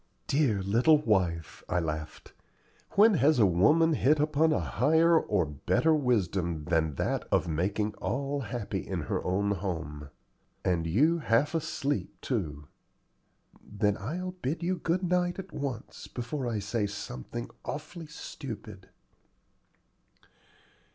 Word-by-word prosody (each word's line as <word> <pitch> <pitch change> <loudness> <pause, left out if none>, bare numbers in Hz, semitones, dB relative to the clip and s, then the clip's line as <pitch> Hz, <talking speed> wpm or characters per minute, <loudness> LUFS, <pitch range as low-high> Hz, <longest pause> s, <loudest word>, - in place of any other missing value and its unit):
"Dear 130 -9 +1
little 120 +11 +5
wife!" 95 - 0
I 90 - +1
laughed; 80 -2 -5 0.6
"when 215 +2 +6
has 150 -3 +4
woman 115 - +4
hit 150 +1 +3
upon 155 +1 +3
a 155 - +2
higher 160 +10 +3
or 100 - 0
better 85 - +1
wisdom 95 - 0
than 80 -3 +1
that - - -1
of - - +2
making 100 +6 -1
all 140 +8 -2
happy 120 -4 -3
in - - -4
her - - -2
own 100 +3 0
home? 80 -7 -4 0.6
and 85 -3 +1
you 150 - +3
half 135 +2 +2
asleep, 150 -3 -2
too." 75 - -3 1.0
"Then 105 0 0
I'll 170 - -4
bid 170 -2 -4
you 180 +1 0
good 175 +3 0
night 180 0 +1
at 195 0 -8
once, 130 -5 -5
before 125 +2 -4
I 115 -2 -1
say 105 +1 -1
something 100 - -6
awfully 155 +2 -6
stupid." 110 -10 -8
115 Hz, 125 wpm, -29 LUFS, 95-155 Hz, 1.0 s, when